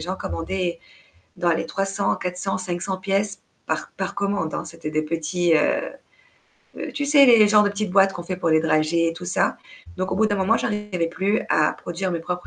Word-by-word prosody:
gens 180 +4 -4
commandaient 175 -1 -3 0.6
dans 175 - +1
les 165 - -1
300-400-500 190 -1 -2
pièces 195 +2 -1 0.3
par - - -3
par 195 +1 -3
commande, 200 -5 -1
hein. - - -3
C'étaient 165 -1 -7
des 155 0 0
petits, 165 +2 0
heu 155 - +3 1.0
heu, - - -5
tu 290 - -2
sais, 280 -1 +7
les 225 -4 +7
genre 210 0 +6
de 205 - +1
petites 205 -1 -3
boîtes 195 +1 +4
qu'on 175 - -6
fait 180 +1 -4
pour 170 -3 0
les 155 - +4
dragées 165 +1 +2
et - - -2
tout 175 +2 -9
ça, 180 - 0 0.4
donc 185 - -2
au 185 - -1
bout 220 - +3
d'un 205 -1 0
moment, 195 +4 +2
j'arrivais 210 -7 -2
plus 195 +6 0
à 150 0 +3
produire 180 +2 -4
mes 170 - -2
propres 180 +2 -5
185 Hz, 195 wpm, -23 LUFS, 170-200 Hz, 1.0 s, sais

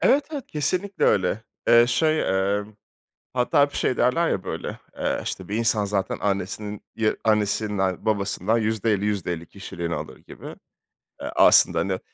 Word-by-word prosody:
Evet, 280 +2 +4
evet 285 -5 -5
kesinlikle 180 +7 -1
öyle. 95 +3 +2 0.3
Eee, 120 0 +7
şey, 155 +6 +2 0.4
emm, 105 +1 -8 0.6
hatta 125 +3 +2
hep 140 0 +2
şey 130 - 0
derler 165 +7 +2
ya 95 - -1
böyle, - - -5 0.2
eee, - - -1
işte 95 - -5
bir 105 - -3
insan 110 -2 +1
zaten 100 -1 -2
annesinin 100 +1 -3
Ya, 110 -1 +1
annesinden 105 -3 0
babasından 105 +1 0
%50-%50 105 -6 -1
kişiliğini 85 -3 -5
alır - - -7
gibi. - - -14 0.8
Eee, - - -4
aslında, - - +6
hani, - - -1
105 Hz, 145 wpm, -24 LUFS, 100-125 Hz, 0.8 s, Eee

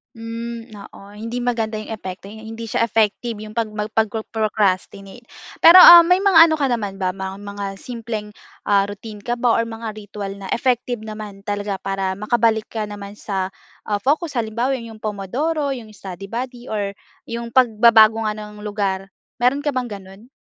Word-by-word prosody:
Hmm, 230 +1 -6
oo. 200 - -12 0.2
Hindi 230 +3 -4
maganda 230 -3 -1
'yong - - -10
epekto, 195 -3 -7
hindi 220 +1 -8
siya 230 - +1
effective 225 +2 0
'yong 215 +1 -10
'pag 230 - +2
mag 210 0 -3
pagpro-procrastinate. 215 -1 -1 0.3
Pero, 355 +2 +9
um, 345 -1 +11
may 360 +2 +3
mga 370 -5 +8
ano 320 - +1
ka 285 -4 0
naman 205 -5 -3
ba, 185 - +1
mga 190 +1 -6
mga 200 0 -6 0.2
simpleng, 230 -3 -5 0.3
ah, 200 -1 +2
routine 210 +2 -8
ka 240 - 0
ba 240 -1 +2
or 230 - +1
mga 225 0 -6
ritual 205 -1 -7
na 195 - -9
effective 245 -2 0
naman 215 -2 -8
talaga 205 -1 -3
para 195 -1 -2
makabalik 220 +2 +1
ka 220 -2 -3
naman 205 0 -9
sa, 190 -3 -3 0.4
ah, 205 - +1
focus? 290 - 0
Halimbawa, 235 +4 -1
'yong 225 -3 -10
Pomodoro, 270 - -2
'yong 235 -4 -9
study 195 -2 -9
buddy, 245 +1 -5
or 200 -2 -2 0.3
‘yong 235 0 -5
pagbabago 225 -2 +5
nga 210 - -4
ng 210 0 -9
lugar, 200 -2 -2 0.3
mayro'n 275 +4 +2
ka 290 - +1
bang 250 -1 -2
gano’n? 195 +4 -15
220 Hz, 170 wpm, -21 LUFS, 205-240 Hz, 0.4 s, um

